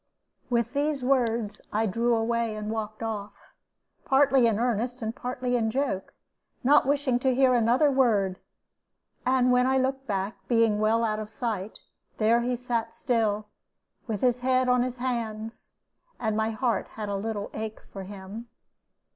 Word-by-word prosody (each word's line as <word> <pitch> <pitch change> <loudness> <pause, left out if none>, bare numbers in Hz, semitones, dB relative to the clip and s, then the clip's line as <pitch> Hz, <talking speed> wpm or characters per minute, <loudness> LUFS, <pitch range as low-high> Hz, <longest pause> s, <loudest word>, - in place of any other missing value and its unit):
With 235 0 0
these 290 -1 0
words, 235 -5 +1
I 220 +2 +1
drew 230 +4 +1
away 230 0 0
and 215 0 -4
walked 215 0 -4
off, 205 -2 -4 0.7
partly 270 -2 +4
in 220 -3 +1
earnest 240 +1 -1
and 220 +1 -3
partly 250 -1 -2
in 225 -2 +1
joke, 245 -6 -2 0.5
not 280 +1 +5
wishing 275 -3 +1
to 260 0 +1
hear 260 -1 +4
another 245 +5 +4
word; 210 -8 +2 0.9
and 255 -1 +4
when 250 0 +4
I 265 0 +3
looked 265 +1 -1
back, 195 -1 -2
being 230 -3 +3
well 220 +2 +2
out 215 -1 0
of 215 -1 -6
sight, 220 -4 -4 0.4
there 230 +2 +3
he 245 +1 0
sat 235 -2 -3
still, 215 -3 0 0.6
with 215 -4 -3
his 250 -1 +2
head 255 0 +2
on 250 0 +4
his 250 0 -2
hands, 230 -3 -4 0.5
and 220 -2 -1
my 220 +1 +1
heart 230 +1 -1
had 215 -1 -3
a 200 - -2
little 205 0 -3
ache 220 0 -5
for 195 - -6
him. 200 +4 -8
230 Hz, 160 wpm, -27 LUFS, 215-250 Hz, 0.9 s, not